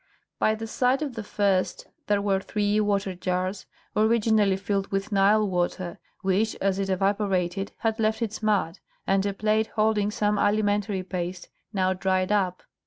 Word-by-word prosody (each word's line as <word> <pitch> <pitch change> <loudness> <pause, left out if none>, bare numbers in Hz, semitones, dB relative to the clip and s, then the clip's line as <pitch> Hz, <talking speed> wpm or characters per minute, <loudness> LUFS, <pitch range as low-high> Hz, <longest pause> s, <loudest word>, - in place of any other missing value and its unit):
By 215 - +3
the 225 +1 -6
side 250 +5 +1
of 280 -4 -4
the 225 -2 -5
first 200 -3 0 0.2
there 205 -1 +2
were 195 -2 +2
three 205 +1 0
water 200 -2 0
jars, 185 +2 -2 0.3
originally 215 -2 +3
filled 195 0 -1
with 195 +1 -3
Nile 205 +2 +4
water, 175 -1 -2 0.2
which, 195 +4 +1
as 195 0 0
it 195 -1 -1
evaporated, 195 -1 0
had 225 0 -1
left 220 +1 +1
its 220 -1 -4
mud, 205 -5 0 0.3
and 195 0 +2
a 200 - -1
plate 215 +1 +1
holding 215 -1 +2
some 210 -1 0
alimentary 205 -2 +1
paste, 180 -1 -5 0.2
now 190 -3 +1
dried 185 0 0
up. 185 -3 0
200 Hz, 160 wpm, -26 LUFS, 190-215 Hz, 0.3 s, Nile